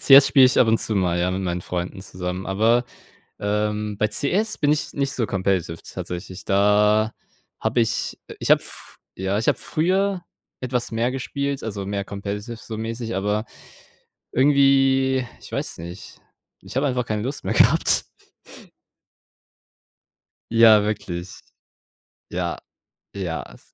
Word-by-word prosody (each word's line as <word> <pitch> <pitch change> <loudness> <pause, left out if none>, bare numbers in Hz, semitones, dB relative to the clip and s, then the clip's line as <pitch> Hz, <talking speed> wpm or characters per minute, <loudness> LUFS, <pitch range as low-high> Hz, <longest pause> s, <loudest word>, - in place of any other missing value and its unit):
CS 140 0 +8
spiele 135 -3 +7
ich 125 - +2
ab 115 - +4
und 115 0 +3
zu 110 - -3
mal, 90 -3 +1
ja, 90 +1 +1
mit 95 +1 -2
meinen 90 -1 -2
Freunden 90 +1 -4
zusammen, 90 0 -5
aber, 115 +5 +2 0.6
ähm, 105 0 -1
bei 105 - +2
CS 195 - -1
bin 145 -1 +2
ich 150 - -1
nicht 140 -1 -1
so 120 -3 0
competitive 95 -4 -1
tatsächlich. 90 +1 -7
Da 105 +2 +3 0.5
habe - - 0
ich 115 - -1
äh, - - -10
ich - - +1
habe - - +6
f - - -10 0.2
ja, 95 +2 -1
ich 110 - -2
habe - - +3
früher 185 +3 0 0.4
etwas 125 -1 -2
mehr 115 +2 0
gespielt, 140 +1 -3
also, 100 -3 -4
mehr 100 0 -2
competitive 100 +3 -5
so 110 0 -8
mäßig, 115 +1 -4
aber 105 +3 -1 0.9
irgendwie 135 -1 +3 0.2
ich - - -13
weiß - - -4
nicht, 85 +4 -10 0.4
ich - - -11
habe 140 +2 +2
einfach 125 -2 -1
keine 110 -2 -2
Lust 135 +4 -4
mehr - - 0
gehabt. - - +6 2.5
Ja, 115 -2 +7
wirklich. 90 -4 -4 0.9
Ja, 85 -1 -3 0.6
ja, 90 -5 -3
es - - -21
110 Hz, 145 wpm, -23 LUFS, 95-130 Hz, 2.5 s, CS